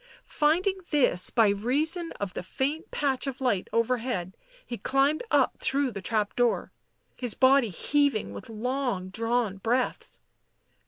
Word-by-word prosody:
Finding 360 +6 +1
this 250 - +3
by 225 -3 +4
reason 295 - +1
of 200 -3 -5
the - - -4
faint 275 - -3
patch 275 -2 -1
of 265 -1 -4
light 245 -8 0
overhead, 230 -5 -1 0.3
he 240 - -5
climbed 275 +3 +2
up - - +2
through 275 -1 0
the 200 -3 -6
trap 210 0 -1
door, 245 -1 +1 0.4
his 245 -4 -2
body 265 -2 +4
heaving 280 - 0
with 255 - -9
long 240 -4 -2
drawn 225 0 -1
breaths. 240 +6 -1
250 Hz, 140 wpm, -27 LUFS, 215-280 Hz, 0.4 s, by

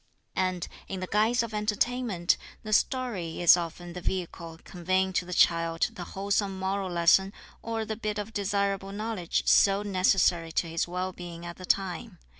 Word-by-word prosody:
And, 185 -2 -1 0.2
in 190 - -4
the 185 - -3
guise 220 +5 +2
of 230 -1 -6
entertainment, 210 -3 +1 0.3
the 215 -1 -3
story 210 -10 0
is 175 -1 +8
often 175 0 -5
the 180 - -6
vehicle 170 -2 -4
conveying 185 +1 0
to 180 - 0
the 180 - -9
child 165 0 +3
the 185 -5 -7
wholesome 200 0 0
moral 190 0 -2
lesson 175 +3 +4 0.3
or 225 -1 -3
the 220 +1 -3
bit 215 -1 -3
of 210 +2 -5
desirable 200 -1 -1
knowledge 210 -4 -2
so 200 +1 +5
necessary 185 -4 +2
to 170 - 0
his 165 +1 -1
well 180 +1 -3
being 175 -1 -8
at 170 0 -7
the 185 - -8
time. 190 -1 -1
190 Hz, 170 wpm, -28 LUFS, 175-210 Hz, 0.3 s, is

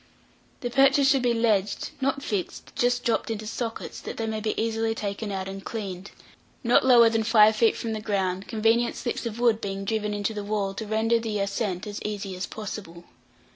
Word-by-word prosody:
The 245 -2 -3
perches 275 +2 +5
should 270 -1 +4
be 245 -1 +2
ledged 215 -4 +1
(not 275 +1 0
fixed 200 -8 -4
just 245 0 +1
dropped 230 -1 0
into 220 -1 -3
sockets, 230 +1 -5
that - - -7
they 225 - -2
may 220 -1 -2
be 215 0 -2
easily 225 0 0
taken 205 0 -4
out 190 -1 -3
and 195 0 -7
cleaned) 200 -3 -5 0.5
not 240 0 +4
lower 245 -3 +7
than 225 0 +2
five 220 -1 +5
feet 225 0 +3
from 225 -1 -3
the 215 - -4
ground, 195 -3 -1
convenient 225 +1 +2
slips 240 -1 -3
of 230 0 -6
wood 230 -2 +3
being 195 0 -4
driven 215 0 -1
into 205 +2 -1
the 210 -1 -4
wall, 200 -1 -1
to 215 +2 -6
render 225 +2 +2
the 225 -2 -3
ascent 200 -1 -2
as 205 -1 -6
easy 200 -2 -4
as 185 - -4
possible. 195 -5 -7
220 Hz, 200 wpm, -26 LUFS, 200-230 Hz, 0.5 s, lower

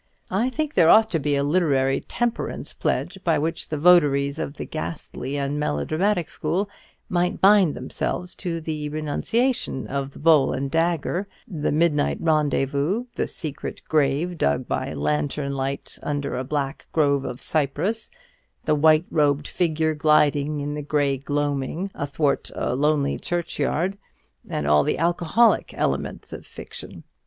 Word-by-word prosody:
I 220 +7 +1
think 300 +3 -2
there 165 -3 +5
ought 220 +3 +6
to 165 - +1
be 145 0 0
a 140 - +1
literary 140 -4 +2
temperance 240 -1 -3
pledge 190 - -2
by 165 - +2
which 160 +3 -2
the 155 - -2
votaries 145 -3 +4
of 140 - -4
the - - -5
ghastly 155 -3 -5
and 140 +1 -1
melodramatic 155 - 0
school 175 +7 -1 0.4
might 180 0 0
bind 195 -5 +5
themselves 180 +7 -3
to 170 -3 -2
the 155 -2 -4
renunciation 155 - -1
of 140 0 -3
the - - -15
bowl 150 -4 +4
and 135 +1 -3
dagger, 170 +3 0 0.2
the 155 -5 -2
midnight 150 -1 +2
rendezvous, 150 - +1
the - - -1
secret 150 -4 -6
grave 155 +3 +1
dug 70 0 +1
by - - -2
lantern 75 - -1
light 135 +1 -4
under 145 -2 -2
a 130 - -2
black 140 0 -3
grove 140 -3 +2
of 125 -2 -5
cypress, 160 +9 0 0.6
the 155 - +3
white 155 +2 +4
robed 145 -2 +2
figure 160 -2 0
gliding 150 -1 +2
in 145 +1 -3
the 150 - -4
grey 145 -1 +1
gloaming 145 +6 -2
athwart 145 0 -1
a - - -1
lonely 145 0 +1
churchyard, 175 +2 -1 0.5
and 75 - -2
all 75 0 +4
the - - 0
alcoholic 175 +7 +2
elements - - -2
of - - -7
fiction. - - -10
150 Hz, 145 wpm, -24 LUFS, 140-170 Hz, 0.6 s, ought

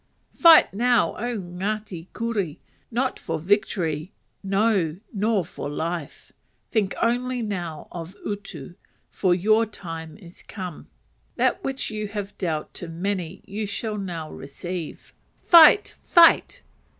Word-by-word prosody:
Fight 330 - +7
now, 240 +2 +2
O 240 +1 -2
Ngati 190 -1 -4
Kuri! 210 -9 -3 0.3
not 255 +3 -1
for - - -3
victory, 175 -3 0 0.3
no, 195 -5 +1 0.2
nor 205 -2 +1
for 145 - -6
life. 165 +1 -5 0.4
Think 205 -4 0
only 245 +1 0
now 175 -7 -5
of 170 +2 -8
utu! 195 -8 -6 0.4
for 185 -3 +2
your 215 +5 +3
time 165 -6 -8
is 175 -4 -15
come. 185 -5 -8 0.5
That 375 - +1
which 270 -4 -3
you 215 -1 -3
have 205 -1 -6
dealt 160 -5 -2
to 175 - -7
many, 180 +1 -4
you 210 +1 -4
shall 210 +1 -3
now 170 -5 -5
receive. 165 +5 -7 0.3
Fight! 340 +4 +7
fight! 335 -1 +5
195 Hz, 125 wpm, -24 LUFS, 170-220 Hz, 0.5 s, Fight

